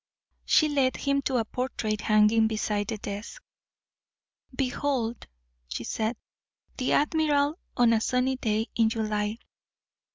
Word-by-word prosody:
She 310 Hz, -, +4 dB
led 275 Hz, -3 st, +1 dB
him 280 Hz, 0 st, 0 dB
to 265 Hz, -1 st, 0 dB
a 225 Hz, -, 0 dB
portrait 220 Hz, -3 st, -3 dB
hanging 215 Hz, +1 st, +4 dB
beside 210 Hz, -2 st, -1 dB
the 220 Hz, -, -3 dB
desk. 205 Hz, -, -7 dB, 1.2 s
"Behold," 255 Hz, -3 st, -1 dB, 0.4 s
she 60 Hz, -, -5 dB
said, 220 Hz, -, -2 dB, 0.6 s
"the 255 Hz, -, 0 dB
admiral 295 Hz, 0 st, +2 dB, 0.2 s
on 240 Hz, -1 st, +5 dB
a 220 Hz, -, +2 dB
sunny 255 Hz, +2 st, +1 dB
day 220 Hz, -3 st, 0 dB
in 225 Hz, -1 st, +3 dB
July. 215 Hz, -1 st, -1 dB
230 Hz, 125 wpm, -27 LUFS, 215-265 Hz, 1.2 s, on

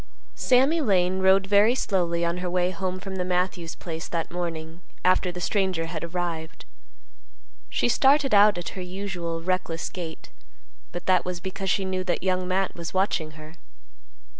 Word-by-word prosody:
Sammy 270 Hz, +6 st, +3 dB
Lane 190 Hz, -6 st, +2 dB
rode 190 Hz, +1 st, +4 dB
very 205 Hz, +4 st, +4 dB
slowly 170 Hz, -7 st, 0 dB
on 170 Hz, +1 st, -1 dB
her 180 Hz, 0 st, -3 dB
way 180 Hz, 0 st, +1 dB
home 185 Hz, +1 st, -3 dB
from 190 Hz, 0 st, -6 dB
the 180 Hz, -, 0 dB
Matthews 180 Hz, -2 st, -1 dB
place 165 Hz, -2 st, -6 dB
that 165 Hz, -1 st, -3 dB
morning 165 Hz, -1 st, -5 dB, 0.2 s
after 185 Hz, 0 st, +3 dB
the 180 Hz, -, -7 dB
stranger 185 Hz, -3 st, 0 dB
had 165 Hz, -1 st, -5 dB
arrived. 170 Hz, -, -4 dB, 1.0 s
She 120 Hz, -, +1 dB
started 270 Hz, -, +4 dB
out 205 Hz, -1 st, +6 dB
at 175 Hz, -, -4 dB
her 190 Hz, -, -7 dB
usual 180 Hz, -3 st, -4 dB
reckless 180 Hz, -2 st, -1 dB
gait, 160 Hz, -, -7 dB, 0.6 s
but 175 Hz, -, -6 dB
that 185 Hz, -1 st, +3 dB
was 180 Hz, -1 st, -4 dB
because 190 Hz, +2 st, -4 dB
she 195 Hz, +1 st, +1 dB
knew 185 Hz, 0 st, -2 dB
that 175 Hz, -, -1 dB
Young 185 Hz, -1 st, 0 dB
Matt 190 Hz, +1 st, 0 dB
was 170 Hz, +1 st, -7 dB
watching 175 Hz, -5 st, 0 dB
her. 155 Hz, +2 st, -12 dB
180 Hz, 165 wpm, -25 LUFS, 170-190 Hz, 1.0 s, out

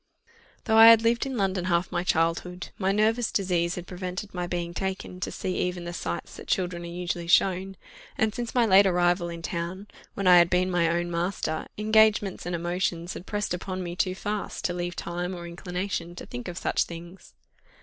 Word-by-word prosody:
Though 220 Hz, -2 st, +2 dB
I 225 Hz, -, +11 dB
had 230 Hz, -1 st, +8 dB
lived 235 Hz, +3 st, +2 dB
in 265 Hz, -2 st, -4 dB
London 190 Hz, -3 st, 0 dB
half 175 Hz, 0 st, +1 dB
my 175 Hz, -, -1 dB
childhood, 175 Hz, +1 st, 0 dB
my 190 Hz, -1 st, +2 dB
nervous 220 Hz, +3 st, +2 dB
disease 180 Hz, -3 st, 0 dB
had 180 Hz, -, -6 dB
prevented 185 Hz, +2 st, -6 dB
my 180 Hz, -1 st, -3 dB
being 175 Hz, -1 st, -3 dB
taken 190 Hz, 0 st, -4 dB
to -, -, -3 dB
see 185 Hz, -, -3 dB
even 180 Hz, -1 st, -2 dB
the 175 Hz, 0 st, -5 dB
sights 85 Hz, -, -5 dB
that -, -, -10 dB
children 180 Hz, -2 st, -1 dB
are 170 Hz, -, -7 dB
usually 175 Hz, 0 st, -4 dB
shown; 190 Hz, +2 st, +2 dB, 0.4 s
and 220 Hz, -1 st, +1 dB
since 240 Hz, +1 st, -5 dB
my 240 Hz, -2 st, +4 dB
late 195 Hz, -1 st, +6 dB
arrival 175 Hz, -1 st, +2 dB
in 170 Hz, -1 st, -7 dB
town, 175 Hz, +4 st, -4 dB, 0.3 s
when 200 Hz, -, -3 dB
I 180 Hz, -1 st, +8 dB
had 170 Hz, 0 st, +4 dB
been 185 Hz, +1 st, +2 dB
my 170 Hz, -2 st, +2 dB
own 175 Hz, +1 st, -1 dB
master, 170 Hz, -2 st, -2 dB
engagements 215 Hz, -3 st, +3 dB
and 175 Hz, -, -1 dB
emotions 175 Hz, 0 st, -2 dB
had 180 Hz, -, -9 dB
pressed 205 Hz, -3 st, -2 dB
upon 185 Hz, +1 st, -4 dB
me 175 Hz, 0 st, -5 dB
too 185 Hz, +1 st, 0 dB
fast 205 Hz, +1 st, -4 dB
to 175 Hz, -, 0 dB
leave 175 Hz, 0 st, -3 dB
time 175 Hz, +2 st, -4 dB
or 175 Hz, -1 st, -7 dB
inclination 175 Hz, 0 st, -4 dB
to -, -, -8 dB
think 120 Hz, 0 st, -7 dB
of 175 Hz, -, -6 dB
such -, -, +1 dB
things. 170 Hz, +2 st, -11 dB
180 Hz, 200 wpm, -26 LUFS, 175-195 Hz, 0.4 s, I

